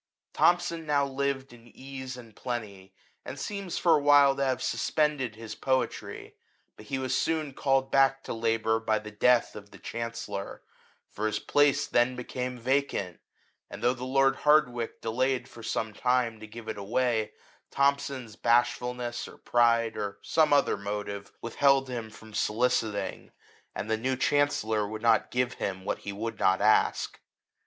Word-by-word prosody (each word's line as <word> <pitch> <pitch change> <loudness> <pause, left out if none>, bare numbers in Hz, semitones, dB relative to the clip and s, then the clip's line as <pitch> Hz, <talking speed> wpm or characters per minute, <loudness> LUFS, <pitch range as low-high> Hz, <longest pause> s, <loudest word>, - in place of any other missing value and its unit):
Thomson 170 -2 +2
now 145 -1 +2
lived 135 -1 -2
in 120 0 -16
ease 130 0 -8
and 115 -4 -13
plenty, 105 -6 -6 0.3
and - - -7
seems 200 -3 -4
for 170 - +4
a 150 - +1
while 145 -1 +6
to 140 - -1
have 130 -2 0
suspended 145 -7 0
his 110 -1 -8
poetry; 130 +3 -2 0.4
but 105 - -14
he 135 - -2
was 130 -1 -1
soon 155 -4 0
called 135 0 +1
back 135 0 +3
to - - -4
labour 115 -1 +1
by 110 -1 +1
the 105 0 -7
death 120 +3 +3
of 105 -1 -10
the - - -14
Chancellor, 115 -4 -5 0.4
for 110 +1 -3
his 110 - -1
place 145 -1 +2
then 120 +1 +2
became 125 0 -4
vacant; 125 - -1 0.5
and - - -9
though 125 - +4
the 125 -1 -8
lord 135 +1 +2
Hardwicke 125 -6 +2
delayed 130 +3 0
for 115 - -13
some 110 -1 -2
time 125 -1 0
to 110 - -9
give 115 +1 -10
it 110 -2 -4
away, 110 +1 0 0.4
Thomson's 140 -4 0
bashfulness, 120 +1 0
or - - -13
pride, 115 -1 +2
or 100 -1 -4
some 160 -2 +2
other 140 -6 +3
motive, 100 0 -5
withheld 135 +3 +3
him 115 -3 -4
from 110 0 -14
soli 115 +5 +1
citing; 105 -5 -2 0.4
and 100 - -4
the 110 0 +1
new 130 +4 -1
Chancellor 125 -6 +1
would 110 +1 -7
not 115 -2 +3
give 125 0 0
him 95 -1 -3
what - - -2
he 100 - -6
would 110 +2 -5
not 95 +1 +3
ask. 110 - +2
120 Hz, 165 wpm, -28 LUFS, 110-135 Hz, 0.5 s, while